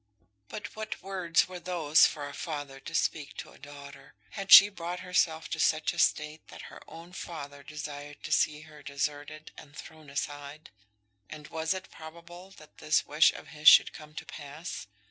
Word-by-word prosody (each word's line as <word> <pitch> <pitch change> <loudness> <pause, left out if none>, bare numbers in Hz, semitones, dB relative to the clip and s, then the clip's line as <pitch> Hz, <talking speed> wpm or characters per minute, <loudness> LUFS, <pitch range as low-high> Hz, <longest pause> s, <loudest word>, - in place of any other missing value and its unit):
But 205 -1 -8
what 220 0 -6
words 185 -3 +1
were 180 -1 -8
those 165 -4 +4
for 145 -2 -6
a 145 - -9
father 145 -3 -6
to 135 - -8
speak 150 -2 -1
to - - -8
a - - -18
daughter! 140 -1 -13 0.2
Had 195 -1 -6
she 200 - +12
brought 180 -3 -6
herself 165 -3 0
to 160 - -4
such 155 -1 +2
a - - -6
state 150 +1 0
that - - -11
her - - -12
own 170 +2 -12
father 145 -5 -8
desired 145 -1 -8
to - - -7
see 150 0 +2
her 155 -1 -14
deserted 145 +1 -5
and 145 -1 -14
thrown 155 -2 -12
aside? 145 +1 -6 0.6
And 150 -2 -10
was 160 +3 -1
it 190 - -8
probable 170 +3 -12
that 155 - -17
this 155 - +1
wish 150 +2 +4
of - - -11
his 150 0 -4
should - - +6
come 150 0 -13
to - - -7
pass? 145 - -8
155 Hz, 185 wpm, -29 LUFS, 145-170 Hz, 0.6 s, she